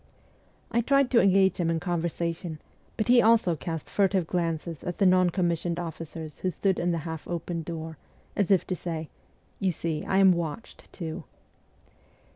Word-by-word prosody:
I 235 0 +2
tried 275 +1 +3
to 235 - +6
engage 190 -1 +4
him 170 -2 0
in 165 -1 +1
conversation; 170 -1 -2 0.4
but 215 - 0
he 245 0 +7
also 225 -7 +4
cast 160 +2 -5
furtive 195 -3 +2
glances 165 -2 -2
at 180 - -4
the 200 - +3
non 185 -1 +5
commissioned 170 -1 -1
officers 165 -2 -6
who 185 - 0
stood 190 +1 0
in 175 - 0
the 170 - 0
half 160 -1 -6
opened 170 -1 -4
door, 160 -1 -6 0.4
as 200 -4 +1
if 195 -3 +4
to 185 - -2
say, 160 -3 -5 0.3
' - - -37
You 190 -2 +1
see, 160 -2 -3
I 190 - 0
am 195 -1 +7
watched, 170 +6 -6
too.' 165 -1 -6
175 Hz, 175 wpm, -27 LUFS, 165-190 Hz, 0.4 s, he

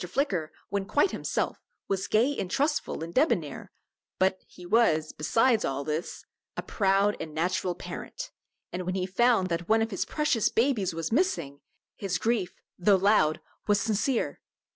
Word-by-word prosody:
Flicker, 185 - -1 0.2
when 200 0 -1
quite 290 - +2
himself, - - -2 0.3
was 195 -1 -1
gay 245 +7 +3
and 190 - -3
trustful 285 - 0
and 165 +1 -7
debonair, 300 +5 0 0.5
but 190 0 +2
he 180 - -13
was, 170 -7 +3
besides 225 - +2
all 135 +1 -1
this, 155 +3 -4 0.3
a - - -2
proud 200 0 +2
and 155 -1 -7
natural 175 +2 0
parent, - - -7 0.4
and 180 0 -4
when 185 - -1
he 185 -1 0
found 195 0 +3
that 170 0 -3
one 225 0 +4
of 225 - -4
his 190 - -1
precious 265 -8 +1
babies 225 -9 +1
was 165 +3 -3
missing, 170 - 0 0.3
his 195 -3 -2
grief, 225 -5 0 0.3
though 195 +3 +5
loud, 190 -5 +3 0.3
was 205 -1 +4
sincere. 225 +3 0
195 Hz, 160 wpm, -28 LUFS, 175-235 Hz, 0.5 s, though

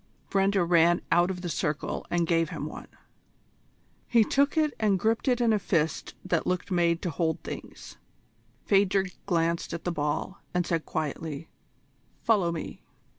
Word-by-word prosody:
Brenda 195 -1 +3
ran 170 0 +4
out 175 +2 +4
of 180 -1 -4
the 180 - -4
circle 150 -2 -2
and 175 -1 +1
gave 165 -1 +2
him - - -5
one. - - -8 1.2
He 230 -2 +5
took 280 +7 +1
it 305 -2 +2
and 210 -3 +3
gripped 225 +7 0
it 250 -2 +3
in 235 -2 +3
a 210 - +2
fist 160 -5 -1
that 165 - 0
looked 185 +2 -1
made 170 -1 +2
to 175 - -1
hold 160 +1 -1
things. - - -8 0.7
Phadrig 195 -2 +2
glanced 170 -2 0
at 170 - -7
the 175 - -1
ball, 150 +5 -2
and 180 -1 +2
said 165 -2 -1
quietly: 155 0 -4 0.7
"Follow 200 -7 +3
me!" 165 -2 -6
175 Hz, 160 wpm, -28 LUFS, 165-200 Hz, 1.2 s, He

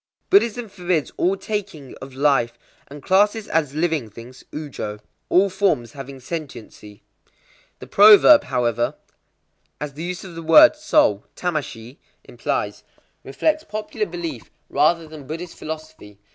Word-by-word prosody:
Buddhism 240 - +3
forbids 180 -6 -2
all 190 +3 +1
taking 195 - -5
of 135 -1 -10
life, 135 -4 +1 0.3
and 145 0 -12
classes 205 +3 +2
as 150 -3 -1
living 155 -7 -1
things 115 +5 -13
(Ujō) 135 -9 -6 0.3
all 190 +2 +4
forms 185 - 0
having 135 0 -9
sentiency. 130 -8 -9 0.7
The - - -11
proverb, 215 +9 +7
however,—as 125 +3 -5
the 155 +4 -7
use 180 0 -5
of 185 -3 -10
the 165 - -7
word 300 - +7
"soul" 205 - +2
(tamashii) 140 -7 -4 0.3
implies,—reflects 310 0 -4
popular 215 +1 -4
belief 165 -8 -6 0.2
rather 160 +3 +2
than 155 -3 -12
Buddhist 165 +3 -7
philosophy. 155 -10 -9
160 Hz, 120 wpm, -21 LUFS, 135-195 Hz, 0.7 s, proverb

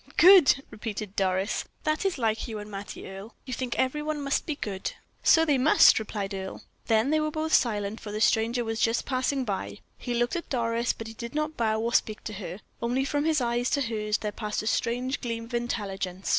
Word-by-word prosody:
"Good!" 345 -7 +7
repeated 210 -2 -5
Doris; 190 +1 0 0.2
"that 310 +4 0
is 385 -5 +1
like 225 -3 0
you 220 -2 -5
and 210 0 -8
Mattie. 200 0 -7
Earle, 195 +4 -9
you 255 - -5
think 250 0 -3
every 260 +3 +1
one 305 0 -2
must 275 -1 -1
be 305 - -1
good." 195 -8 -4 0.3
"So 325 0 +5
they 290 -4 +2
must," 275 -2 +6
replied 205 -2 -4
Earle. 190 0 -6 0.2
Then 225 +4 +3
they 310 - +3
were 305 0 0
both 310 +1 -2
silent, 210 -2 +2
for 210 - -7
the 210 - -3
stranger 225 +2 +2
was 225 0 -3
just 230 0 +1
passing 260 0 0
by. 100 - -3 0.2
He 245 - -3
looked 240 +4 +1
at 340 - -4
Doris, 235 -2 0
but 225 - -8
he 225 - -8
did 235 +4 -7
not 305 0 -1
bow 220 -2 +1
or 230 +2 -1
speak 215 -1 +1
to 215 - -5
her; 195 0 -7 0.2
only 245 +3 0
from 290 +1 0
his 315 -3 +2
eyes 240 0 0
to 285 - +1
hers 215 -3 -1
there 210 - -3
passed 210 0 -3
a - - -7
strange 245 +4 0
gleam 230 -2 -3
of 230 +2 -12
intelligence. 195 -6 -3
230 Hz, 220 wpm, -27 LUFS, 210-270 Hz, 0.3 s, Good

